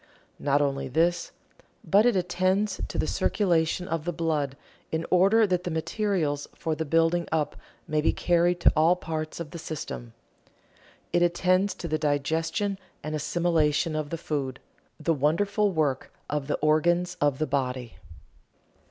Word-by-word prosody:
Not 145 0 +2
only 135 -1 -1
this, 170 +6 +1 0.5
but 205 +4 +4
it 245 - +3
attends 185 +3 0
to - - -6
the - - +1
circulation 175 -2 +1
of 165 -1 -2
the 175 - -2
blood 155 -5 -1 0.3
in 160 +1 -1
order 195 +5 +5
that 180 -3 0
the 180 - -3
materials 160 -3 -1
for 160 - -2
the 160 +1 -3
building 165 +3 +2
up 155 -2 0 0.3
may 155 -1 +1
be - - +3
carried 175 0 +2
to - - +5
all 165 +3 +5
parts 160 -3 -5
of 160 -3 -6
the 170 - -7
system. 130 -7 -6 1.0
It 175 - +3
attends 185 +3 +2
to 170 - -6
the 155 -1 -1
digestion 160 +7 0 0.2
and 155 - -4
assimilation 155 0 +1
of 155 -1 -2
the 165 - -3
food 140 -5 -3 0.4
the 165 - +1
wonderful 200 +8 +1
work 150 -6 -1 0.2
of 145 -2 -2
the 150 - 0
organs 175 +4 +2
of 145 -2 +2
the 155 - 0
body. 130 -4 -2
160 Hz, 155 wpm, -27 LUFS, 150-175 Hz, 1.0 s, order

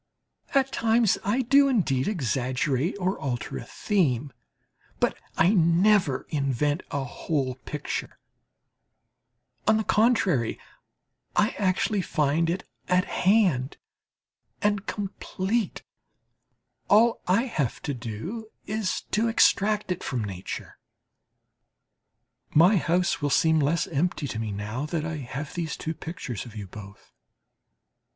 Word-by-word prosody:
At 270 -1 +3
times 225 -2 +2
I 235 +7 +1
do 275 +3 +5
indeed 165 - +1
exaggerate 130 - 0
or 185 +1 -1
alter 125 -5 -3
a - - -7
theme; 145 - 0 0.7
but - - +2 0.2
I 175 +5 +5
never 175 -3 +3
invent 145 +2 0
a 140 -1 -2
whole 135 +1 -2
picture 150 -1 -4 1.5
on 220 - +5
the 220 - 0
contrary, 210 - +2 0.8
I 210 +2 +3
actually 195 +1 +1
find 155 0 +1
it 180 +3 -3 0.2
at 180 0 +3
hand 180 - +2 0.8
and 205 -1 0
complete 200 +1 -2 1.1
all 230 +3 +5
I 190 +6 +3
have 150 - -2
to 145 - -2
do 130 - -6 0.2
is 215 -2 -1
to 220 +3 +2
extract 210 -2 +3
it 180 - -3
from 125 -5 -2
nature. 95 -3 -6 1.8
My 180 +7 +6
house 175 -1 +1
will 145 - +1
seem 160 +3 +3
less 150 +2 +1
empty 155 -1 -1
to 110 - -4
me 110 -2 -3
now 105 +8 -4
that 155 -1 -2
I 160 -1 -3
have 135 +2 -6
these 165 -3 -3
pictures 160 - -5
of 115 - -12
you 105 -2 -5
both. 100 +1 -12
165 Hz, 120 wpm, -26 LUFS, 135-205 Hz, 1.8 s, My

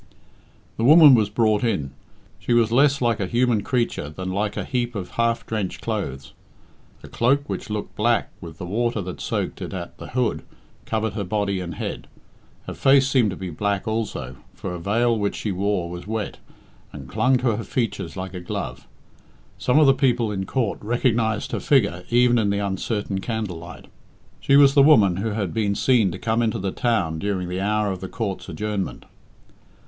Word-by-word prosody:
The 115 - -1
woman 150 +2 +9
was 110 -4 +3
brought 110 0 +2
in. 85 - -1 0.5
She 120 - -1
was 115 -1 +3
less 140 +3 +3
like 115 -2 +1
a 100 - -1
human 120 0 +2
creature 120 - -1
than 95 +4 -5
like 100 +2 -2
a - - -1
heap 120 -2 -2
of 90 -3 -5
half 115 +2 0
drenched 105 -4 -3
clothes. 70 - -4 0.7
A - - -9
cloak 140 +5 +1
which - - -5
looked 105 -1 -4
black 120 +2 +1
with 85 -3 -9
the 90 - -6
water 115 +4 -1
that 90 0 -7
soaked - - -3
it - - -5
at 85 -2 -7
the - - -8
hood 125 0 -1 0.5
covered 110 -1 -1
her 105 -1 -3
body 100 0 -1
and 85 -3 -5
head. - - -5 0.6
Her - - -6
face 135 0 +4
seemed 130 -5 +3
to 95 - -4
be 95 -1 -6
black 100 +5 -2
also, 100 - -3 0.2
for 90 - -5
a 90 - -5
veil 115 +6 +1
which 100 -1 -1
she 105 - -3
wore 95 -1 -1
was 90 +2 -8
wet, 110 -1 -4 0.5
and 70 -3 -9
clung 130 - +2
to 120 -3 +1
her 115 - -4
features 115 -5 -3
like 95 0 -5
a 90 - -5
glove. 90 - -6 0.7
Some 125 - +2
of 155 - +6
the 135 - +6
people 125 -5 +1
in 95 -2 -3
court 120 -6 -1
recognised 115 -1 0
her - - -2
figure 100 -10 +1
even 120 0 +4
in 105 -2 +1
the 100 - 0
uncertain 100 0 -2
candlelight. 95 -6 -5 0.5
She 140 - +3
was 140 -1 +7
the 140 - +6
woman 110 - +5
who 105 +4 -1
had 100 -5 -2
been 105 -3 0
seen 115 -7 +3
to 85 - -6
come 110 +4 0
into 110 -2 0
the 95 0 -2
town 90 -11 0
during 95 -2 -2
the 90 +1 -3
hour 105 0 0
of 95 - -5
the 95 - -6
court's 105 -5 -4
adjournment. 105 -2 -4
105 Hz, 195 wpm, -23 LUFS, 95-120 Hz, 0.7 s, woman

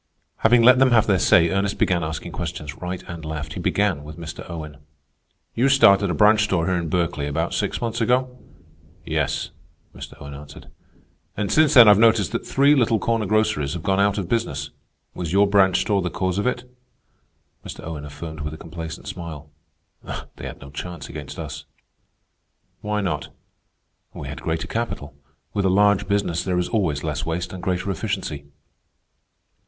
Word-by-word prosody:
Having 115 +1 +4
let 125 +2 +7
them 135 0 +5
have 115 -3 +4
their 95 -3 +2
say, 85 -1 +4
Ernest 100 +1 0
began 90 -3 +1
asking 80 0 -5
questions 75 -1 -5
right 90 0 -5
and 85 -2 -8
left. 75 -1 -5
He - - -6
began 95 -8 0
with 75 +1 -10
Mr. 80 -1 -7
Owen. 75 -4 -7 0.8
"You 125 +4 +2
started 100 -7 +5
a - - -1
branch 105 0 +5
store 95 -5 0
here 95 +1 +1
in 85 -2 -2
Berkeley 85 -4 -1
about 80 +4 -2
six - - -1
months 115 0 -2
ago?" 125 +2 +1 0.7
"Yes," - - -1 0.4
Mr. - - -10
Owen 70 0 -9
answered. 70 +1 -12 0.7
"And 105 -1 -1
since 155 -2 +4
then 120 -4 +10
I've 105 -1 +7
noticed 110 -4 +4
that - - -4
three 140 +2 +4
little 120 -5 +3
corner 115 0 0
groceries 110 -9 +1
have 85 - -6
gone 95 -1 +1
out 100 0 +2
of 95 -4 -2
business. 75 -11 -2 0.4
Was 85 -3 -4
your 100 +1 +5
branch 100 -2 +4
store 100 -2 +1
the 90 - -2
cause 95 +1 -1
of 105 - 0
it?" 125 0 -2 1.0
Mr. - - -9
Owen 80 -2 -6
affirmed 75 +2 -8
with 75 +1 -5
a - - -11
complacent 80 +1 -8
smile. 80 -4 -8 0.5
"They - - -8
had - - -9
no 70 0 -11
chance 85 +3 -7
against 75 0 -8
us." - - -7 1.1
"Why 105 0 -2
not?" 80 -7 -2 0.9
"We - - -7
had - - -7
greater 80 +1 -2
capital. 90 -9 -4 0.4
With 100 - 0
a - - +4
large 100 +1 +3
business 100 -4 0
there 90 -1 -1
is 90 - -1
always 85 -10 0
less 75 -1 -2
waste 85 +2 -3
and 95 - -7
greater 90 +2 -1
efficiency." 75 -4 -4
90 Hz, 180 wpm, -23 LUFS, 80-105 Hz, 1.1 s, then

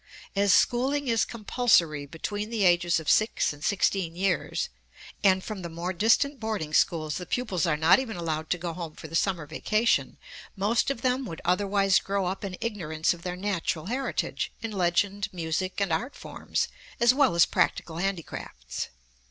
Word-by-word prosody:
As 200 0 +3
schooling 265 +8 +2
is 230 -2 +2
compulsory 195 - +2
between 205 +8 -4
the 225 -3 0
ages 175 -1 +4
of 160 - -9
six 215 -7 +3
and 145 +1 -13
sixteen 190 -4 +1
years, 195 +2 0 0.5
and 190 -2 +4
from 215 -3 -6
the 170 - -5
more 170 +3 -4
distant 230 +9 +2
boarding 210 -9 -3
schools 155 -2 +2
the 180 - -7
pupils 195 -10 -1
are 150 -2 +1
not 160 +10 +5
even 230 -7 -4
allowed 160 -2 -3
to 180 - +1
go 170 -1 -4
home 165 -3 -6
for 160 - -9
the 165 - -7
summer 175 -3 +1
vacation, 215 +9 0 0.4
most 215 +6 +1
of 275 -5 -3
them 255 +1 +1
would 160 - -7
otherwise 195 +1 +3
grow 195 -1 -1
up 190 +3 -3
in 190 -2 -5
ignorance 165 -9 -1
of 170 - -12
their 180 0 -4
natural 175 -5 -2
heritage, 255 +6 -2
in 225 - -3
legend, 195 +2 +1
music, 180 +2 -2
and 195 -4 +1
art 215 - -2
forms - - -3 0.3
as 235 +1 +6
well 265 -8 +3
as 170 - +6
practical 165 -1 0
handicrafts. 165 - -4
190 Hz, 175 wpm, -27 LUFS, 165-215 Hz, 0.5 s, as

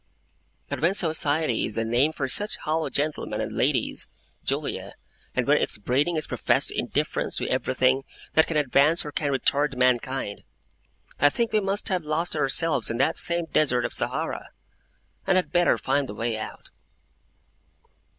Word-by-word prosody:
But - - -4
when 170 +5 +2
society 155 - +1
is 105 - -1
the 115 - 0
name 120 +7 +2
for 140 -3 -3
such 205 +10 +1
hollow 155 +1 -2
gentlemen 150 +1 -2
and - - -3
ladies, - - 0 0.4
Julia, - - -3 0.4
and - - +1
when - - +4
its - - -1
breeding 135 +11 0
is 155 - 0
professed - - +1
indifference - - -2
to - - -2
everything 130 +1 +1 0.3
that 160 - +4
can 160 - -1
advance 145 +3 +3
or 150 - -5
can 145 -1 -1
retard 140 +1 +1
mankind, 125 -3 0 0.8
I 145 - +6
think 235 +7 -1
we 215 - +4
must 200 +2 -2
have 185 -3 0
lost 160 +3 -1
ourselves 150 -2 +1
in 115 - -2
that 135 - +2
same 170 0 +3
Desert 135 -6 +1
of - - -3
Sahara, - - -2 0.8
and 190 - +3
had 185 - +1
better 175 -1 +3
find 140 -1 0
the 105 - -6
way 115 +1 -2
out. 110 - -7
145 Hz, 160 wpm, -25 LUFS, 130-165 Hz, 0.8 s, I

